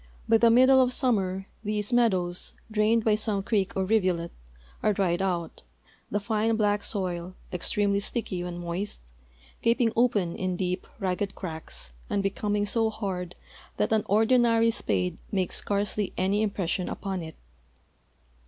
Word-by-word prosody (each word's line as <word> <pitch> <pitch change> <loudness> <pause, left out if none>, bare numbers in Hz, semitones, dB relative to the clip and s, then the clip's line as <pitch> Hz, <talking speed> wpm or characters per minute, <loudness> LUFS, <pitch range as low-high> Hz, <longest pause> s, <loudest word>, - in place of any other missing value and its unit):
By 225 - +5
the 235 - +6
middle 260 +3 +6
of 250 -1 +2
summer 195 -8 0 0.2
these 210 +2 0
meadows, 185 -7 +1 0.2
drained 215 +1 +3
by 220 - +4
some 210 -2 -1
creek 200 -3 0
or 190 - +1
rivulet, 185 -5 +1 0.5
are 210 - +2
dried 185 -3 +1
out, 175 -3 -2 0.5
the 205 - 0
fine 220 +1 0
black 210 -1 +2
soil, 185 -3 -3 0.2
extremel}'' 200 +3 +1
sticky 200 -5 -2
when 175 -1 -5
moist, 175 - -5 0.5
gap 230 0 +2
ing 235 -3 +3
open 215 -8 +2
in 185 -1 -2
deep, 180 0 -2
ragged 195 0 -2
cracks 160 - -4 0.2
and 200 - 0
becoming 205 +1 0
so 225 +1 +1
hard 185 -5 -4 0.4
that - - +1
an 220 - +3
ordinary 230 +1 +4
spade 95 - -1
makes 190 -3 0
scarcely 205 0 -1
any 195 +3 +1
impression 190 -4 -1
upon 190 -2 -4
it. 160 -1 -8
200 Hz, 145 wpm, -27 LUFS, 180-220 Hz, 0.5 s, the